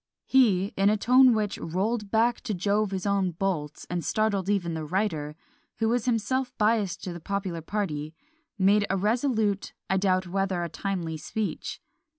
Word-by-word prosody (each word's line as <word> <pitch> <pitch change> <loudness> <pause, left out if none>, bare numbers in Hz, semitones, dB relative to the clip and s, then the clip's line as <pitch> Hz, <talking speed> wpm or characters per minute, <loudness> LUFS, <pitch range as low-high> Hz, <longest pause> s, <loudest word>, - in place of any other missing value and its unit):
He, 205 -7 +3
in 195 +1 +3
a 215 - +2
tone 250 +2 +6
which 210 -2 -1
"rolled 205 +6 -2
back 230 +3 +2
to 215 -5 -1
Jove 205 +3 +1
his 190 -1 -4
own 200 -2 +2
bolts," 165 -5 -3
and 175 -1 -3
startled 205 -3 0
even 180 -5 0
the 160 -1 -3
writer, 155 -4 -2 0.4
who 225 -1 0
was 235 -1 +1
himself 250 +2 0
biassed 210 -4 +1
to 180 - -4
the 170 - -7
popular 190 -1 -3
party, 155 -5 -3 0.4
"made 205 +1 +4
a 195 - +1
resolute, 215 -1 0 0.2
I 190 - +3
doubt 185 -1 +2
whether 190 -1 -1
a 170 - -3
timely, 170 -3 -3
speech." 215 +7 -4
200 Hz, 165 wpm, -27 LUFS, 180-215 Hz, 0.4 s, tone